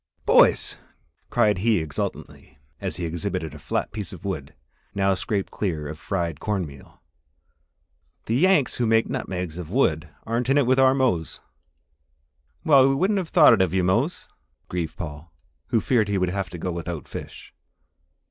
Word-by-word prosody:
"Boys," -, -, +4 dB, 0.5 s
cried 105 Hz, -3 st, +2 dB
he 110 Hz, +2 st, +2 dB
exultantly, 75 Hz, -3 st, -5 dB, 0.2 s
as 95 Hz, -2 st, -3 dB
he 90 Hz, -, -3 dB
exhibited 85 Hz, -1 st, -3 dB
a 75 Hz, -, -10 dB
flat -, -, -2 dB
piece 105 Hz, -4 st, -4 dB
of 95 Hz, -1 st, -10 dB
wood, 75 Hz, -8 st, -5 dB, 0.4 s
now 100 Hz, 0 st, +2 dB
scraped 100 Hz, +1 st, -2 dB
clear 80 Hz, -7 st, -3 dB
of 75 Hz, +1 st, -7 dB
fried 85 Hz, -6 st, -3 dB
cornmeal, 90 Hz, -10 st, -5 dB, 1.2 s
"the 110 Hz, -, -2 dB
Yanks 155 Hz, +1 st, +3 dB
who 120 Hz, -, +1 dB
make 115 Hz, 0 st, +3 dB
nutmegs 90 Hz, -2 st, -4 dB
of 85 Hz, -3 st, -7 dB
wood 80 Hz, -, +1 dB, 0.2 s
aren't 115 Hz, +2 st, -1 dB
in 135 Hz, -, +4 dB
it 140 Hz, -, +4 dB
with 130 Hz, +2 st, +3 dB
our 130 Hz, 0 st, +5 dB
Mose!" 120 Hz, -12 st, 0 dB, 1.3 s
"Well! 135 Hz, -4 st, +6 dB
we 135 Hz, -, +2 dB
wouldn't 195 Hz, +7 st, +1 dB
have 175 Hz, -4 st, -5 dB
thought 160 Hz, -4 st, +7 dB
it -, -, +3 dB
of 95 Hz, -1 st, +1 dB
you, 95 Hz, -, +2 dB
Mose," 115 Hz, -, 0 dB, 0.4 s
grieved 85 Hz, -3 st, -4 dB
Paul, 75 Hz, 0 st, -7 dB, 0.4 s
who 115 Hz, -, +2 dB
feared 110 Hz, -1 st, +1 dB
he 100 Hz, -1 st, 0 dB
would 90 Hz, -1 st, +1 dB
have 95 Hz, +1 st, -3 dB
to 90 Hz, -, -8 dB
go 90 Hz, +2 st, -3 dB
without 85 Hz, -2 st, -5 dB
fish. -, -, -9 dB
95 Hz, 165 wpm, -24 LUFS, 85-120 Hz, 1.3 s, thought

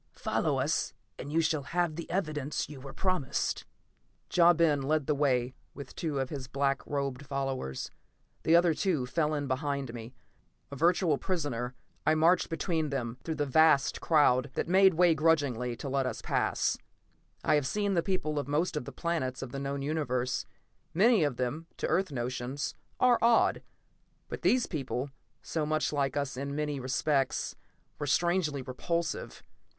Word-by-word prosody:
Follow -, -, 0 dB
us -, -, 0 dB, 0.2 s
and 140 Hz, -, -6 dB
you 165 Hz, +2 st, +3 dB
shall 155 Hz, -2 st, +1 dB
have 170 Hz, +3 st, -1 dB
the 170 Hz, -, -6 dB
evidence 155 Hz, -6 st, -2 dB
you 140 Hz, -2 st, -10 dB
were 135 Hz, 0 st, -8 dB
promised." 180 Hz, -4 st, -1 dB, 0.7 s
Ja 175 Hz, 0 st, +7 dB
Ben 160 Hz, -4 st, +3 dB
led 150 Hz, +1 st, +1 dB
the 150 Hz, -, +1 dB
way 130 Hz, -3 st, +1 dB, 0.2 s
with 140 Hz, -2 st, -9 dB
two 155 Hz, -4 st, -2 dB
of 135 Hz, -1 st, -2 dB
his 135 Hz, -4 st, -5 dB
black 140 Hz, +1 st, 0 dB
robed 140 Hz, -2 st, -2 dB
followers. 135 Hz, -, -3 dB, 0.5 s
The 165 Hz, -, +4 dB
other 170 Hz, -1 st, +5 dB
two 155 Hz, -5 st, 0 dB
fell 155 Hz, +4 st, 0 dB
in 145 Hz, -1 st, -2 dB
behind 140 Hz, -2 st, -2 dB
me. 120 Hz, +1 st, -8 dB, 0.6 s
A -, -, -5 dB
virtual 165 Hz, 0 st, +2 dB
prisoner, 130 Hz, -9 st, -2 dB, 0.3 s
I 155 Hz, -, +3 dB
marched 170 Hz, +3 st, +3 dB
between 165 Hz, -2 st, -1 dB
them, 125 Hz, -3 st, -3 dB
through 160 Hz, -, -3 dB
the 145 Hz, -1 st, 0 dB
vast 145 Hz, 0 st, +4 dB
crowd 145 Hz, -4 st, +4 dB
that -, -, -1 dB
made 190 Hz, 0 st, +5 dB
way 175 Hz, 0 st, +5 dB
grudgingly 140 Hz, -7 st, +1 dB
to 140 Hz, -, -7 dB
let 135 Hz, -1 st, 0 dB
us -, -, -5 dB
pass. -, -, 0 dB, 0.6 s
I -, -, +3 dB
have 145 Hz, -3 st, +2 dB
seen 205 Hz, +5 st, 0 dB
the 170 Hz, -, +3 dB
people 160 Hz, -5 st, -1 dB
of 140 Hz, -, -4 dB
most 155 Hz, +5 st, 0 dB
of 150 Hz, -, -3 dB
the -, -, -7 dB
planets 135 Hz, -7 st, -2 dB
of 130 Hz, -, -7 dB
the 135 Hz, -, -4 dB
known 140 Hz, 0 st, -3 dB
Universe. 130 Hz, -4 st, -1 dB, 0.5 s
Many 215 Hz, 0 st, +5 dB
of 145 Hz, -5 st, 0 dB
them, 135 Hz, +6 st, -3 dB
to -, -, -2 dB
Earth 185 Hz, -3 st, +1 dB
notions, 125 Hz, +2 st, -3 dB, 0.3 s
are 250 Hz, -1 st, +5 dB
odd. 230 Hz, 0 st, +4 dB, 0.7 s
But -, -, -6 dB
these 250 Hz, -1 st, +3 dB
people, 135 Hz, -3 st, -3 dB, 0.3 s
so 160 Hz, -, -2 dB
much 155 Hz, 0 st, 0 dB
like 140 Hz, -1 st, 0 dB
us 140 Hz, -2 st, -2 dB
in 140 Hz, +1 st, -3 dB
many 150 Hz, -2 st, -2 dB
respects, 135 Hz, +2 st, 0 dB, 0.4 s
were 145 Hz, -, -3 dB
strangely 165 Hz, -2 st, +1 dB
repulsive. 165 Hz, +6 st, -3 dB
145 Hz, 170 wpm, -30 LUFS, 135-165 Hz, 0.7 s, Ja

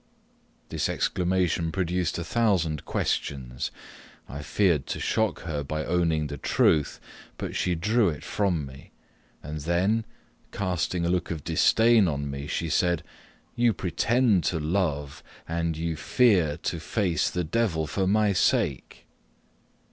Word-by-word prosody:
This -, -, -1 dB
exclamation 90 Hz, -2 st, 0 dB
produced 90 Hz, -1 st, -1 dB
a 85 Hz, -, -3 dB
thousand 90 Hz, -9 st, 0 dB
questions. 65 Hz, -3 st, -2 dB, 0.6 s
I 70 Hz, -, -7 dB
feared 85 Hz, -3 st, +1 dB
to -, -, -3 dB
shock 110 Hz, -4 st, 0 dB
her 75 Hz, -3 st, -3 dB
by 75 Hz, +2 st, -3 dB
owning 85 Hz, -3 st, +1 dB
the 75 Hz, -1 st, -6 dB
truth, 75 Hz, +2 st, +2 dB, 0.4 s
but -, -, -5 dB
she 90 Hz, -1 st, 0 dB
drew 105 Hz, +4 st, +2 dB
it 75 Hz, -, -6 dB
from 90 Hz, -8 st, 0 dB
me; 65 Hz, 0 st, -13 dB, 0.5 s
and 75 Hz, +1 st, -5 dB
then, 95 Hz, +8 st, +1 dB, 0.5 s
casting 90 Hz, -2 st, -1 dB
a -, -, +1 dB
look 90 Hz, -1 st, 0 dB
of 80 Hz, -4 st, -4 dB
disdain 110 Hz, +5 st, +4 dB
on 70 Hz, -2 st, -2 dB
me, 70 Hz, +1 st, -6 dB
she 85 Hz, -, -2 dB
said 85 Hz, +1 st, +1 dB, 0.5 s
"You 120 Hz, -1 st, +3 dB
pretend 105 Hz, +3 st, +2 dB
to 85 Hz, -, 0 dB
love, 75 Hz, -4 st, -1 dB, 0.3 s
and 85 Hz, -1 st, -1 dB
you 80 Hz, 0 st, -2 dB
fear 90 Hz, -, +3 dB
to 85 Hz, +1 st, -3 dB
face 90 Hz, -1 st, 0 dB
the 90 Hz, -, -2 dB
Devil 85 Hz, -3 st, 0 dB
for 95 Hz, +4 st, -1 dB
my 105 Hz, 0 st, +3 dB
sake!" 70 Hz, -7 st, 0 dB
85 Hz, 140 wpm, -26 LUFS, 75-95 Hz, 0.6 s, disdain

